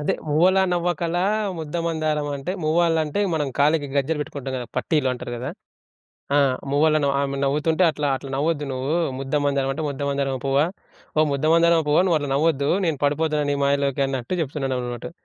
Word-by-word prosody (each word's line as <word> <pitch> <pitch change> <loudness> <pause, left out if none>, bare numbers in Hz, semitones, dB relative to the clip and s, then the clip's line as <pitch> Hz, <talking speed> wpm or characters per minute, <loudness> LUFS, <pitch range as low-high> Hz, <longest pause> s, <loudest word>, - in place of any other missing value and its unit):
అదే 150 - 0
మువ్వలా 185 +6 +4
నవ్వకల 175 -1 -1 0.4
ముద్దమందారం 155 -2 -2
అంటే 160 +7 -4
మువ్వాలంటే 160 +1 +1
మనం 150 -3 0
కాలికి 145 0 +3
గజ్జెలు 150 +3 0
పెట్టుకుంటాం 140 -2 -5
కదా! 125 - -5
పట్టీలు 150 -5 +1
అంటారు 120 -1 -6
కదా! 125 - -4 0.9
ఆహ్, 140 -3 +4 0.2
మువ్వలను 150 0 +3
ఆమె 140 0 -2
నవ్వుతుంటే 150 +5 +1
అట్లా, 150 -2 -2
అట్లా 135 +1 -9
నవ్వద్దు 150 0 0
నువ్వు. 130 +4 -2 0.2
ముద్దమందారం 140 0 0
అంటే 155 +4 -4
"ముద్దమందారం 140 -1 -2
పువ్వా, 135 +2 +3 0.5
ఓ - - +6
ముద్దమందారం 165 +3 +3
పువ్వా 150 +4 +4
నువ్వుట్లా 150 -5 0
నవ్వొద్దు, 145 -1 +1 0.2
నేను 160 -4 0
పడిపోతున్నా 150 +1 +1
నీ 145 - +1
మాయలోకి" 140 -1 +1
అన్నట్టు 135 +5 -3
చెప్తున్నాడన్నట్టు. 130 -4 -3
145 Hz, 145 wpm, -23 LUFS, 140-160 Hz, 0.9 s, ఓ